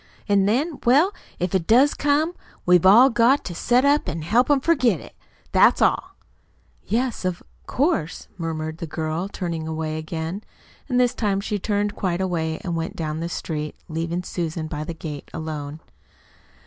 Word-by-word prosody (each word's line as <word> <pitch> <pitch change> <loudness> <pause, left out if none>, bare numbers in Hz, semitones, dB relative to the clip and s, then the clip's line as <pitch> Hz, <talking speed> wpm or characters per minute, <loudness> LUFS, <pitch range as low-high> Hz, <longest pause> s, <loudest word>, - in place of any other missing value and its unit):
"An' 200 -2 +3
then 285 +9 0
well, 290 +11 +4 0.2
if 180 +1 -2
it 185 -3 0
does 260 +6 +5
come, 295 +4 +1 0.3
we've 180 0 +5
all 240 +7 +8
got 240 +4 +3
to 175 - -5
set 240 +8 +2
to 285 +2 +2
an' 160 0 -4
help 230 - +2
him 290 -2 +4
forget 255 - +2
it. - - -13 0.4
That's - - +5
all." - - +1 0.7
"Yes, 240 +2 -1
of 185 -1 -2 0.2
course," 265 - -1
murmured 160 -2 -4
the 165 - -5
girl, 160 +4 -3
turning 170 -5 -4
away 155 0 -3
again. 160 +5 -5 0.5
And 250 -1 +2
this 245 -1 +3
time 200 -3 0
she 205 +1 -3
turned 205 +1 -1
quite 180 -3 -1
away 165 -4 -1
and 170 -2 -2
went 165 0 -3
on 160 - -1
down 155 +1 -3
the 170 +1 -3
street, 155 -3 -4
leaving 165 +2 -3
Susan 165 -2 -3
by 150 -1 -4
the 165 +1 -6
gate 150 -3 -7
alone. 155 -1 -5
180 Hz, 175 wpm, -23 LUFS, 160-240 Hz, 0.7 s, all